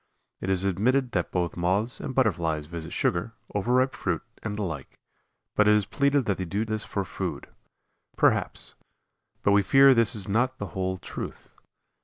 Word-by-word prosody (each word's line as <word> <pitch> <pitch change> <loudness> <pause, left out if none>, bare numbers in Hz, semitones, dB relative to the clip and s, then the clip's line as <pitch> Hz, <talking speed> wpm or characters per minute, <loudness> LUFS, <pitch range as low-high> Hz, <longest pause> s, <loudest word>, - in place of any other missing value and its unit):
It 95 - -4
is 95 -1 +2
admitted 120 +7 +1
that 90 -3 -1
both 90 -1 -1
Moths 100 +8 0
and 130 - -5
Butterflies 85 - +1
visit 85 0 -7
sugar, 110 +7 -1 0.2
overripe 125 +6 +2
fruit, - - -2 0.2
and 105 -2 -4
the 105 - -1
like, 80 -7 -6 0.6
but 105 - +4
it 105 - +6
is 105 -2 +2
pleaded 140 +3 +1
that 100 -3 0
they 95 - -3
do 100 +6 -1
this 110 -1 -3
for 100 -1 -3
food. - - -4 0.7
Perhaps; - - +2 0.7
but 100 - +4
we 100 0 +5
fear 135 +7 +6
this 115 -1 +3
is 100 -2 -1
not 125 +6 +1
the 100 -5 -5
whole 95 0 -2
truth. 95 - -8
100 Hz, 175 wpm, -26 LUFS, 90-120 Hz, 0.7 s, it